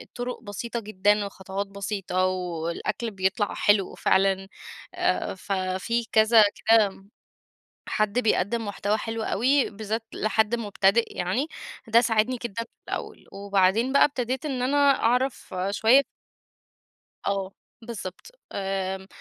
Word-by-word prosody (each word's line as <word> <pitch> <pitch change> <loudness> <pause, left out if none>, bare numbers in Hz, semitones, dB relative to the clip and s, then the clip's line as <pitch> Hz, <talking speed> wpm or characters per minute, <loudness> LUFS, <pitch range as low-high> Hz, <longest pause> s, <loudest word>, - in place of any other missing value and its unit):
طُرُق 245 0 -4
بسيطة 230 +3 -4
جدًا 205 -1 +1
وخطوات 195 0 -5
بسيطة 195 -2 -2
والأكل 180 +5 -3
بيطلع 195 +2 0
حلو 205 -2 +2
فعلًا، 195 0 +2 0.5
آآ - - 0
ففي 190 +5 -2
كذا 220 0 +6 0.2
كام 205 -3 +3 0.8
حد 215 +2 +1
بيقدِم 225 0 +1
محتوى 205 +1 -1
حلو 225 0 -4
أوي 265 +7 +2
بالذات 220 +2 -4
لحد 220 +1 +1
مبتدئ 205 0 +1
يعني، 190 - 0 0.4
ده 230 +2 +5
ساعدني 230 +2 +1
جدًا 230 0 -3
في - - -21 0.2
الأول. - - -5
وبعدين 200 +5 +1
بقى 280 - +7
ابتديت 260 0 -3
إن 265 -4 -2
أنا 275 +3 +1 0.3
أعرف 250 -2 0 0.2
شوية 230 +6 +5 1.3
آه 195 -1 -1 0.3
بالضبط. 225 - -8 0.2
آمم، 190 -1 -3
210 Hz, 115 wpm, -25 LUFS, 195-235 Hz, 1.3 s, بقى